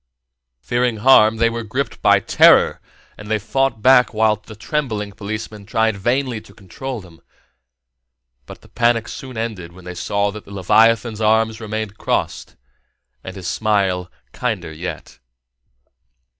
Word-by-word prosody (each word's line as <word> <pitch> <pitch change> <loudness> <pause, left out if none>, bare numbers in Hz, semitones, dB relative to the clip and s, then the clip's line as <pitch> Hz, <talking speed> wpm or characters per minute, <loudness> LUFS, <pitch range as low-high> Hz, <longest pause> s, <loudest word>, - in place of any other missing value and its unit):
Fearing 120 - 0
harm, 110 -1 +5
they 115 +1 +3
were 115 0 -4
gripped 125 +5 -4
by - - +5
terror, - - +4 0.4
and 105 0 -10
they 110 - +2
fought 115 +1 -1
back 125 -2 +5
while 110 0 +3
the 110 +1 -14
trembling 110 -4 -3
policemen 105 +1 -6
tried 110 +1 0
vainly 120 +3 -1
to 100 - -18
control 120 +6 -7
them; 85 -3 -17 1.3
but - - -11
the - - -18
panic 120 -1 +1
soon 130 -3 -8
ended 105 -7 -5
when 90 0 -15
they 90 - -6
saw 100 +3 -1
that 105 0 -9
the - - -14
leviathan's 110 +3 +2
arms 110 +1 +2
remained 110 -1 -5
crossed - - -2 0.7
and 95 - -8
his 95 -3 -7
smile 95 -4 0 0.2
kinder 80 - -3
yet. 85 0 -7
110 Hz, 145 wpm, -19 LUFS, 100-115 Hz, 1.3 s, harm